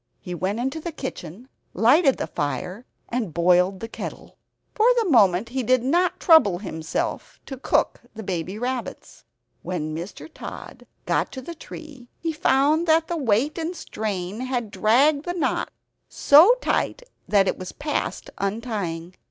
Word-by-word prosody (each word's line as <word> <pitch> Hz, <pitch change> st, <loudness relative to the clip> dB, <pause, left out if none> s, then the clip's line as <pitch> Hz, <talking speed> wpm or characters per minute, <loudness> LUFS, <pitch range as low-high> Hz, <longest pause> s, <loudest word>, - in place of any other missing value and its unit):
He 180 Hz, -, -7 dB
went 190 Hz, +5 st, -2 dB
into 265 Hz, +6 st, -2 dB
the 340 Hz, +2 st, -5 dB
kitchen, 240 Hz, -, -7 dB, 0.3 s
lighted 270 Hz, +5 st, +4 dB
the -, -, -2 dB
fire 180 Hz, -, -4 dB, 0.2 s
and 230 Hz, -10 st, -3 dB
boiled 180 Hz, +2 st, +3 dB
the 225 Hz, -, -4 dB
kettle; -, -, -8 dB, 0.4 s
for 435 Hz, +2 st, +3 dB
the 455 Hz, -4 st, +2 dB
moment 200 Hz, -3 st, +4 dB
he 260 Hz, +2 st, -2 dB
did 255 Hz, +1 st, +2 dB
not 345 Hz, +7 st, +1 dB
trouble 285 Hz, -, +6 dB
himself 160 Hz, -5 st, -4 dB
to 270 Hz, -, -6 dB
cook 260 Hz, -, 0 dB
the 220 Hz, -, -7 dB
baby 185 Hz, +1 st, -3 dB
rabbits. 245 Hz, 0 st, -5 dB, 0.4 s
When 155 Hz, -3 st, -4 dB
Mr. 170 Hz, +5 st, -7 dB
Tod -, -, -9 dB, 0.2 s
got -, -, 0 dB
to 260 Hz, -, -6 dB
the 340 Hz, -, -7 dB
tree, 300 Hz, -5 st, -11 dB
he 330 Hz, -, -2 dB
found 300 Hz, +3 st, +2 dB
that 320 Hz, 0 st, +4 dB
the 345 Hz, -, -1 dB
weight 275 Hz, +2 st, +1 dB
and 330 Hz, +2 st, -3 dB
strain 205 Hz, -, -4 dB
had 250 Hz, -4 st, -3 dB
dragged 280 Hz, +9 st, +3 dB
the 350 Hz, -, -2 dB
knot 350 Hz, -, -1 dB, 0.4 s
so 330 Hz, +12 st, +6 dB
tight -, -, -1 dB, 0.2 s
that 200 Hz, -2 st, +3 dB
it -, -, -1 dB
was 185 Hz, 0 st, -6 dB
past 295 Hz, 0 st, -3 dB
untying. 195 Hz, -5 st, -3 dB
240 Hz, 155 wpm, -24 LUFS, 185-300 Hz, 0.4 s, trouble